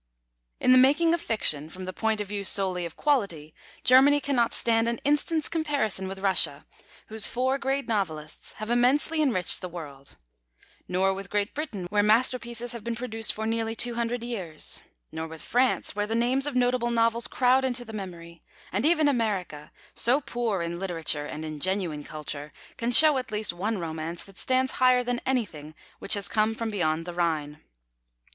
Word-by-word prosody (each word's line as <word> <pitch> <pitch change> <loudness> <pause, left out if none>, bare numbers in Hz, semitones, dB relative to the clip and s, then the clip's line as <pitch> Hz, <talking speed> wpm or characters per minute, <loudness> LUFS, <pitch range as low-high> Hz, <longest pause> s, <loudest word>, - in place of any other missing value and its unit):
In 255 - +3
the 255 - +7
making 300 +6 +4
of 340 - 0
fiction, 155 -9 +1
from 185 +3 -8
the 185 - -5
point 220 0 -1
of 205 - -5
view 205 0 -4
solely 185 -2 +1
of 165 - -14
quality, 195 - -1 0.3
Germany 270 +3 +6
cannot 260 -5 +1
stand 230 0 +2
an 235 - -2
instant's 295 +2 +1
comparison 285 - -1
with 190 +1 -6
Russia, 195 -1 +3 0.4
whose 220 -1 +2
four 260 +2 0
great 270 +1 -1
novelists 160 -9 -3
have 215 +2 -6
immensely 275 +6 +2
enriched 225 - +1
the 180 - -5
world; 145 -5 -10 0.7
nor 190 +2 +1
with 195 +1 -8
Great 205 0 -1
Britain, 250 - -5
where 205 0 +3
masterpieces 235 +2 +1
have 235 -3 -7
been 235 +1 -3
produced 225 -2 0
for 220 - -5
nearly 225 0 -1
two 240 +1 +2
hundred 235 0 -2
years; 190 -10 -3 0.3
nor 160 0 -5
with 160 -1 -10
France, 250 -3 +1
where 205 0 -1
the 225 - -2
names 255 +4 +1
of 290 - -3
notable 245 -1 +1
novels 230 0 +2
crowd 255 +1 +2
into 245 -2 -2
the 225 - -10
memory; 170 -5 -8 0.3
and 205 - +1
even 315 -2 +3
America, 200 - -2 0.2
so 250 +4 +3
poor 235 -9 -2
in 170 +1 -4
literature 165 -5 0
and 155 +1 -6
in 155 -1 -6
genuine 180 -4 -1
culture, 150 0 -7 0.2
can 235 - -2
show 300 +2 +7
at 250 - -7
least 210 -3 -2
one 205 +5 -2
romance 165 0 -5
that 195 -2 -14
stands 260 0 +1
higher 255 -1 +5
than 245 0 -2
anything 170 - -2 0.2
which - - +3
has 200 -1 0
come 215 +1 +1
from 225 -1 -3
beyond 165 -5 -1
the 175 - -6
Rhine. 155 -4 -2
220 Hz, 180 wpm, -26 LUFS, 180-250 Hz, 0.7 s, the